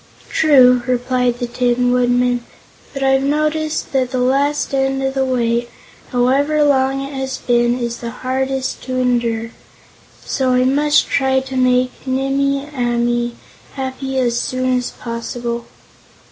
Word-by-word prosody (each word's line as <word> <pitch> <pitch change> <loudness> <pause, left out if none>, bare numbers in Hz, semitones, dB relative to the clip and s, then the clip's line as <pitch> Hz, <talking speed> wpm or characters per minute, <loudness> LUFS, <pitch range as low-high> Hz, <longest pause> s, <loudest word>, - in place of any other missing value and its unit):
"True," 255 -5 +5
replied 250 -1 0
the 245 - -2
Tin 245 0 +1
Woodman; 245 0 +2 0.5
"but 275 -1 -4
I've 270 0 +3
noticed 305 +2 -1
that 260 -2 +1
the 255 - -3
last 275 +4 +1
end 270 0 0
of 265 0 -1
a 270 - +1
wait, 240 -2 0 0.4
however 280 +5 +2
long 270 -1 +2
it 275 +1 -7
has 265 -1 -3
been, 240 0 +1
is 235 -1 -3
the 235 - -6
hardest 260 +2 -3
to 255 0 -3
endure; 235 -2 0 0.7
so 260 -1 0
I 250 0 +3
must 290 +3 +3
try 265 -1 +2
to 265 0 -7
make 255 0 +2 0.2
Nimmie 275 +1 0
Amee 240 -1 0 0.4
happy 265 0 -4
as 240 -2 +1
soon 255 0 -1
as 250 -1 -1
possible." 235 0 -5
255 Hz, 140 wpm, -18 LUFS, 245-270 Hz, 0.7 s, True